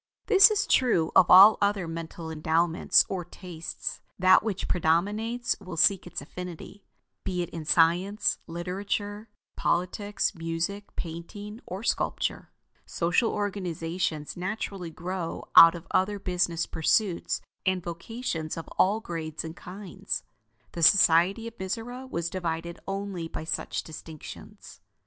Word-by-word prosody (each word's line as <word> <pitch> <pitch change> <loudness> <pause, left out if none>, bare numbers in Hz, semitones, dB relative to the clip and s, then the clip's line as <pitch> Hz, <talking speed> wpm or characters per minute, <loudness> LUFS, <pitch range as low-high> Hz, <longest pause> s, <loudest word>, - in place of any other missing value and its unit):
This 395 -1 +8
is 415 -1 +1
true 200 -11 +2
of 180 - +6
all 200 +4 +9
other 200 -3 +1
mental 165 0 -6
endowments 160 +2 +3
or 185 -2 -3
tastes; 170 -1 -7 0.2
that 185 0 +6
which 210 -3 -3
predominates 205 +9 0
will 185 -4 -8
seek 190 +2 +3
its 175 - -6
affinity; 180 +5 -9 0.4
be 180 -2 -2
it - - -8
in 165 -2 -6
science, 175 +6 +2
literature, 200 +5 -4 0.3
politics, 195 +4 -1
music, 165 +5 -4
painting, 205 +7 -7
or 190 +4 -6
sculpture. - - -1 0.3
Social 180 +7 +1
organizations 175 -5 -3
naturally 190 -1 -4
grow 175 +1 -5
out 165 +1 +10
of 170 0 -9
other 205 +2 +1
business 180 -3 -1
pursuits 175 +3 0 0.2
and 185 -2 0
vocations 170 -2 -5
of 165 - -6
all 205 +4 +3
grades 160 -5 -5
and 160 0 -7
kinds. 190 +1 -6 0.5
The 170 - -6
society 185 +5 +5
of 230 - -9
Mizora 245 +7 -5
was 170 -4 -3
divided 170 -2 -4
only 195 -3 -4
by 160 - -6
such 160 - -3
distinctions. 160 -1 -11
180 Hz, 125 wpm, -27 LUFS, 165-205 Hz, 0.5 s, out